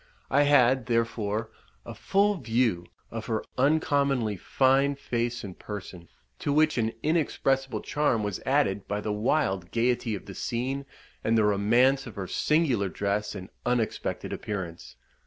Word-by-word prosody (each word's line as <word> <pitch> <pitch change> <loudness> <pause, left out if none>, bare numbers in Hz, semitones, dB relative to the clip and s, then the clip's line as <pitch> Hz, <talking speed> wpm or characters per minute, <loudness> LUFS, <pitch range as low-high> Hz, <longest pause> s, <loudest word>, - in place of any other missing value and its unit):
I 140 +3 +5
had, 130 -3 +4
therefore, 115 -2 -1 0.3
a - - -7
full 200 +1 +2
view 115 - 0 0.2
of 115 -1 -5
her 110 -2 -1
uncommonly 140 -5 +2
fine 135 +8 +2
face 120 -3 -2
and 95 -3 -8
person, 95 -5 -8 0.3
to 145 - -1
which 155 -2 +3
an 115 0 0
inexpressible 135 -4 0
charm 145 -7 0
was 105 -2 -3
added 130 -8 +1
by 105 +1 -2
the 105 0 -2
wild 105 - 0
gaiety 120 -1 +1
of 100 - -9
the 100 - -8
scene, 130 +6 -3 0.4
and 115 0 +2
the 110 - +4
romance 120 +7 +3
of 110 - -9
her 100 -2 -4
singular 130 - +1
dress 105 +2 -2
and 95 -2 -8
unexpected 120 -2 -1
appearance. 90 -5 -6
115 Hz, 145 wpm, -27 LUFS, 105-135 Hz, 0.4 s, I